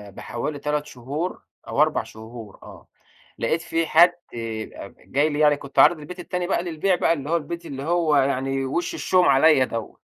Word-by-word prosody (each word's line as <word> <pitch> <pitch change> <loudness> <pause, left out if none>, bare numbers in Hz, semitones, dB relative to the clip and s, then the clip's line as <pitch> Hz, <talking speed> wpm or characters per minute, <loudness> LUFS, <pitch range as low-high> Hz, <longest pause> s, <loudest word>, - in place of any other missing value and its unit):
بحوالي 145 +5 -5
3 150 +1 -2
شهور 145 +7 -5 0.3
أو - - +1
4 - - +2
شهور 110 -1 -11
آه. - - -13 0.5
لقيت 160 +8 0
في 165 -1 -1
حد 175 +2 +6 0.2
أب 115 -2 -6
جاي 145 +3 0
لي 145 0 -3
يعني 150 -1 +4
كنت 140 0 -4
عارض 160 +1 +6
البيت 180 +5 -9
التاني 180 0 -3
بقى 175 -2 0
للبيع 175 +2 0
بقى 165 - +2
اللي 145 -1 -6
هو 170 - +3
البيت 170 +2 -6
اللي 135 0 -6
هو 165 -2 +1
يعني 135 0 +1
وِش 170 +6 -2
الشوم 180 -1 +2
عليّا 140 0 +5
دوّة. 115 -2 -6
150 Hz, 185 wpm, -23 LUFS, 135-170 Hz, 0.5 s, حد